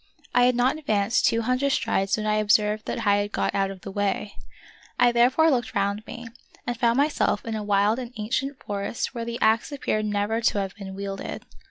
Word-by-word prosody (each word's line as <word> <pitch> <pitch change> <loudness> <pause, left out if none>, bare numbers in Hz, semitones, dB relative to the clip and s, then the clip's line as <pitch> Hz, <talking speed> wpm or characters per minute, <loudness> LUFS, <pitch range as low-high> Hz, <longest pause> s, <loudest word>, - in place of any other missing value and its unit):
I 245 0 +5
had 250 0 +3
not 255 +5 +1
advanced 215 -6 +1
two 230 0 +1
hundred 255 +4 +1
strides 195 +2 0
when 215 - -3
I 215 0 +1
observed 210 0 +2
that 230 - -3
I 205 0 +4
had 205 0 -2
got - - -1
out 195 -1 +1
of 195 -1 -9
the 195 - -7
way. 205 +1 -2 0.7
I 245 - +5
therefore 255 +7 +4
looked 240 -4 -1
round 200 +2 0
me, 235 0 -8 0.4
and 245 - -2
found 235 +1 +2
myself 285 -7 +1
in 225 - -3
a 215 - -2
wild 205 +3 +2
and 245 -2 -6
ancient 260 +6 -2
forest 200 +4 -3
where 235 -2 -4
the 235 0 -4
axe 220 +5 +2
appeared 215 -6 -1
never 210 +2 -1
to 225 - +2
have 195 -1 -3
been 190 -2 -9
wielded. 195 0 -6
220 Hz, 210 wpm, -25 LUFS, 205-240 Hz, 0.7 s, I